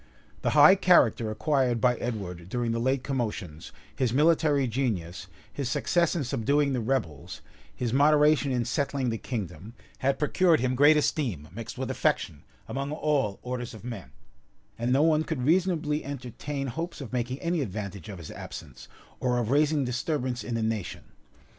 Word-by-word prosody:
The - - +1
high 150 +5 +9
character 170 - +4
acquired 125 +1 +1
by 125 +2 +3
Edward 95 -7 -5
during 120 +1 -1
the 115 - -1
late 130 +2 0
commotions, 110 - -4 0.2
his 130 -4 0
military 150 0 +3
genius, 105 -9 -2 0.3
his 140 -4 -3
success 170 +7 +1
in 160 - 0
subduing 140 +3 +1
the 125 - 0
rebels, 110 - -3 0.3
his 120 -2 -2
moderation 150 0 +4
in 120 -2 0
settling 135 -2 -1
the 115 - -3
kingdom, 105 - -6 0.2
had 135 +1 +1
procured 165 +3 +3
him 130 +1 0
great 145 +4 +6
esteem, 115 - -1
mixed 115 +2 -7
with - - -3
affection, 70 - -1 0.3
among 140 +1 -3
all 145 -9 0
orders 125 -2 -5
of 110 - -12
men; 115 - -7 0.7
and 120 +2 -2
no 135 +3 +4
one 155 -1 +3
could 155 -6 -3
reasonably 160 -2 +1
entertain 140 +1 -5
hopes 165 +7 -5
of 130 -5 -8
making 125 +1 -2
any 170 -2 -1
advantage 100 - -5
of 100 - -7
his 85 -3 -9
absence, 65 -2 -9 0.3
or 125 -1 +1
of 120 -1 -1
raising 145 0 +3
disturbance 125 0 -2
in 120 - -3
the 115 - -1
nation. 110 -4 -3
125 Hz, 165 wpm, -27 LUFS, 110-145 Hz, 0.7 s, high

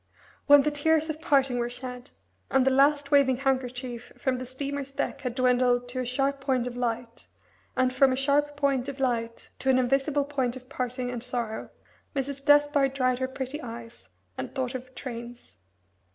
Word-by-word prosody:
When 290 -1 +8
the 300 - +1
tears 315 +2 +2
of 310 +1 -9
parting 270 -6 +2
were 240 0 -1
shed, 250 +1 -8 0.4
and 265 -1 +3
the 265 - +4
last 280 +2 +3
waving 275 -3 +5
handkerchief 255 -2 -2
from 255 -2 -1
the 255 - -6
steamer's 275 +1 -4
deck 280 +1 -3
had 250 -2 -3
dwindled 250 -1 +2
to 255 +1 -4
a 255 - -1
sharp 275 +2 0
point 260 -3 +1
of 250 -1 -5
light, 235 -1 -3 0.5
and 255 0 +2
from 270 0 +5
a - - +1
sharp 290 +2 +1
point 280 -2 +1
of 275 0 -7
light 230 -3 -2
to 265 - -1
an 260 - +5
invisible 275 +3 +1
point 265 -4 -1
of 255 0 -12
parting 250 -1 -3
and 240 -2 -4
sorrow, 240 -3 -3 0.5
Mrs. 275 0 -3
Despard 290 -2 +4
dried 255 -2 +1
her 260 - 0
pretty 265 +3 -5
eyes, 230 - -9 0.3
and 130 - -5
thought 260 -1 -2
of 255 0 -8
trains. 240 - -8
260 Hz, 180 wpm, -27 LUFS, 245-280 Hz, 0.5 s, When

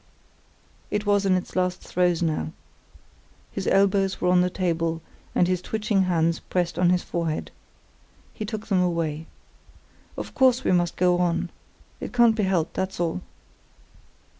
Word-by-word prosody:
It 210 0 -2
was 205 -1 +2
in 185 - +4
its 180 - -4
last 180 -1 0
throes 175 -1 +1
now. 155 - -1 1.0
His - - -4
elbows 195 -1 +2
were 180 - +1
on 180 0 +5
the 180 - +2
table, 165 -3 -1 0.4
and 175 - +4
his 180 -1 0
twitching 210 -2 0
hands 165 -2 +1
pressed 175 -2 -2
on 180 -1 +4
his 180 0 +2
forehead. 165 -2 -3 0.8
He 215 - -5
took 215 0 -5
them 195 -5 +2
away. 165 -3 -1 0.9
"Of - - -6
course 260 -1 +4
we - - +2
must 175 -2 +2
go 180 0 +3
on. 175 -2 0 0.5
It - - -6
can't 235 -2 +5
be 215 - 0
helped, 175 -4 0
that's 190 0 -3
all." 165 - -1
180 Hz, 155 wpm, -25 LUFS, 170-195 Hz, 1.0 s, on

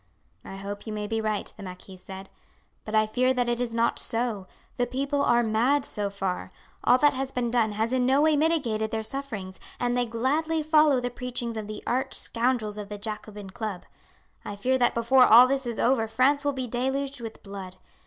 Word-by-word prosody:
"I - - -9
hope 200 +2 -7
you 215 - -4
may 210 0 -3
be 225 +1 -2
right," 215 -1 -2
the - - -10
marquis 185 0 -9
said; 190 +1 -10 0.5
"but 215 - -3
I 215 0 +5
fear 255 +4 +1
that 245 -1 +1
it 240 0 0
is 235 -2 -2
not 235 0 +1
so. 225 -5 -1 0.3
The 245 - +1
people 280 +3 -1
are 240 -3 +3
mad 245 +6 +2
so 205 -6 -2
far. 195 -2 -4 0.3
All 250 - +5
that 290 +2 +4
has 265 0 -3
been 245 -2 -1
done 225 -3 +2
has 220 +4 -1
in 255 -1 +2
no 265 +2 +3
way 310 +1 +4
mitigated 275 -9 +1
their 220 0 -3
sufferings, 220 -7 -5 0.2
and 245 0 0
they 245 -1 +1
gladly 300 +8 0
follow 300 -3 +4
the 245 0 -3
preachings 245 -1 -4
of 215 -2 -5
the 215 - -7
arch 260 +2 -1
scoundrels 230 -3 0
of 205 -1 -7
the 210 - -5
Jacobin 210 -1 -7
Club. 205 -3 -5 0.6
I 205 - -6
fear 255 +6 0
that 240 - +2
before 250 +2 +5
all 240 +3 +9
this 270 -1 -1
is 235 -2 -4
over 235 -3 +2
France 260 +6 +2
will 290 - +1
be 260 -1 -3
deluged 265 +3 -2
with 225 -1 -8
blood. 195 -2 -8
235 Hz, 210 wpm, -26 LUFS, 215-260 Hz, 0.6 s, all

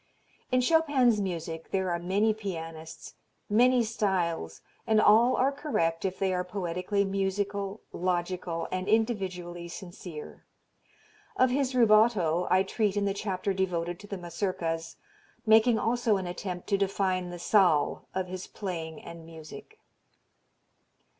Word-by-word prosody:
In 255 0 +3
Chopin's 260 -6 +3
music 165 -3 -4
there 190 -2 0
are 170 - -1
many 200 +5 +2
pianists, 165 -6 -7 0.4
many 245 +3 +5
styles 180 - -1 0.3
and 220 -1 +4
all 225 +4 +5
are 265 +2 +2
correct 195 - -1
if 190 0 -2
they 190 -1 0
are 180 0 0
poetically 180 +2 -1
musical, 195 +1 -2
logical 175 -1 -2
and 185 +1 -2
individually 185 -6 -1
sincere. 175 -3 -9 0.9
Of 255 -1 +4
his 265 0 0
rubato 215 -7 +4
I 185 +1 +4
treat 205 0 -1
in 200 - +1
the 200 - +1
chapter 195 -1 -2
devoted 175 -2 -2
to 205 - -12
the 200 - -5
Mazurkas, 170 -2 -3 0.5
making 220 +1 +5
also 230 -2 +1
an 190 - -4
attempt 180 0 -5
to 200 -2 +2
define 190 -2 0
the 175 - -6
"zal" 175 -4 +2
of 190 -1 0
his 185 0 -7
playing 165 -5 -6
and 170 -1 -10
music. 160 - -11
190 Hz, 135 wpm, -28 LUFS, 175-215 Hz, 0.9 s, many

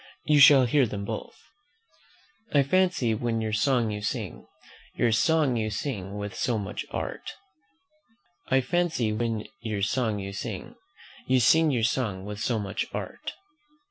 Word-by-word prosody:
You 150 -1 +4
shall 135 -2 +8
hear 130 +1 +3
them 100 -1 -5
both: 110 +1 -6 1.2
"'I 140 - +6
fancy, 180 -6 +2
when 115 +1 -1
your 110 -1 -2
song 115 +1 +2
you 105 0 -4
sing, 105 - -4 0.5
Your 120 - +2
song 130 +4 +2
you 110 -1 -1
sing 105 -4 -4
with 105 0 -5
so 120 -3 -1
much 100 0 -5
art,' - - -5 1.2
or, 130 - +3
"'I - - +4
fancy, 160 -8 0
when 115 -1 -2
your 105 -4 -3
song 115 -2 0
you 100 0 -5
sing, 100 - -6 0.5
You 130 0 +4
sing 160 +7 +5
your 120 -5 0
song 105 -6 -1
with 105 0 -6
so 115 +1 0
much 100 -1 -3
art.'" - - -6
115 Hz, 155 wpm, -27 LUFS, 105-130 Hz, 1.2 s, shall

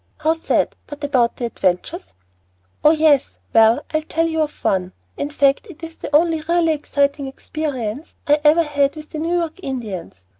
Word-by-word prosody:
"How 310 +1 +2
sad. 325 - 0
But 290 0 -9
about 255 -5 +2
the 245 - -3
adventures?" 180 - -2 0.7
"Oh, 300 - +7
yes 310 -3 +3 0.2
well, 225 +5 +5
I'll 310 - +2
tell 325 +1 -1
you 320 -1 -1
of 300 -1 -4
one; 185 -1 0 0.2
in 285 - -3
fact 280 +5 +2
it 335 -2 -13
is 325 0 -8
the 290 - -3
only 325 0 +3
really 335 +1 +2
exciting 285 -1 0
experience 270 -2 -5
I 295 +1 +3
ever 315 +3 +5
had 285 -2 0
with 310 0 -10
the 310 - -5
New 335 +3 0
York 335 0 -3
Indians. 205 - -6
295 Hz, 180 wpm, -20 LUFS, 260-315 Hz, 0.7 s, Oh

